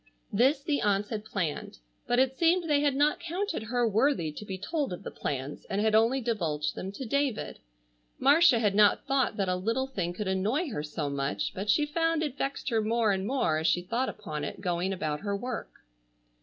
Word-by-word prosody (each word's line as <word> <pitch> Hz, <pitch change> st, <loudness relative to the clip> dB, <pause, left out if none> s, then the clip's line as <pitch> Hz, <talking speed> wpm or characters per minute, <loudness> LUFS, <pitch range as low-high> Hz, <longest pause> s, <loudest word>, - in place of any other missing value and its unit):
This 265 Hz, +7 st, +3 dB
the 290 Hz, -1 st, 0 dB
aunts 205 Hz, 0 st, +1 dB
had 215 Hz, -2 st, -4 dB
planned: 175 Hz, -, -3 dB, 0.3 s
but 245 Hz, -, +2 dB
it 260 Hz, +1 st, +3 dB
seemed 335 Hz, +3 st, +2 dB
they 295 Hz, -2 st, +3 dB
had 285 Hz, -2 st, +2 dB
not 295 Hz, +2 st, +2 dB
counted 345 Hz, -, -3 dB
her 240 Hz, +2 st, 0 dB
worthy 220 Hz, -, +2 dB
to 150 Hz, -, -8 dB
be 195 Hz, -3 st, -5 dB
told 290 Hz, -, -2 dB
of 180 Hz, -, -6 dB
the -, -, -6 dB
plans, 140 Hz, 0 st, -4 dB
and 195 Hz, -, -2 dB
had 215 Hz, +1 st, +2 dB
only 230 Hz, +5 st, +4 dB
divulged 165 Hz, -11 st, -1 dB
them 190 Hz, -, -5 dB
to 265 Hz, -, -6 dB
David. 280 Hz, -1 st, -1 dB, 0.6 s
Marcia 285 Hz, 0 st, +5 dB
had 210 Hz, -3 st, +2 dB
not 205 Hz, 0 st, +4 dB
thought 265 Hz, -5 st, +1 dB
that 195 Hz, -2 st, 0 dB
a 180 Hz, -, +1 dB
little 230 Hz, +8 st, -1 dB
thing 190 Hz, -10 st, -3 dB
could 200 Hz, +3 st, -4 dB
annoy 215 Hz, -, 0 dB
her 150 Hz, -, -3 dB
so 150 Hz, 0 st, -4 dB
much, 135 Hz, -8 st, -2 dB
but 200 Hz, +3 st, -5 dB
she 295 Hz, +8 st, +4 dB
found 325 Hz, +1 st, 0 dB
it 290 Hz, -4 st, -3 dB
vexed 280 Hz, 0 st, -3 dB
her 225 Hz, -2 st, +1 dB
more 225 Hz, 0 st, +2 dB
and 190 Hz, 0 st, -1 dB
more 195 Hz, -, +1 dB
as 160 Hz, -, 0 dB
she 175 Hz, +2 st, +2 dB
thought 235 Hz, +8 st, -1 dB
upon 150 Hz, -1 st, -6 dB
it 145 Hz, -, -5 dB
going 180 Hz, 0 st, -1 dB
about 155 Hz, -5 st, -2 dB
her 200 Hz, -1 st, -2 dB
work. 245 Hz, +2 st, -5 dB
220 Hz, 210 wpm, -29 LUFS, 185-275 Hz, 0.6 s, Marcia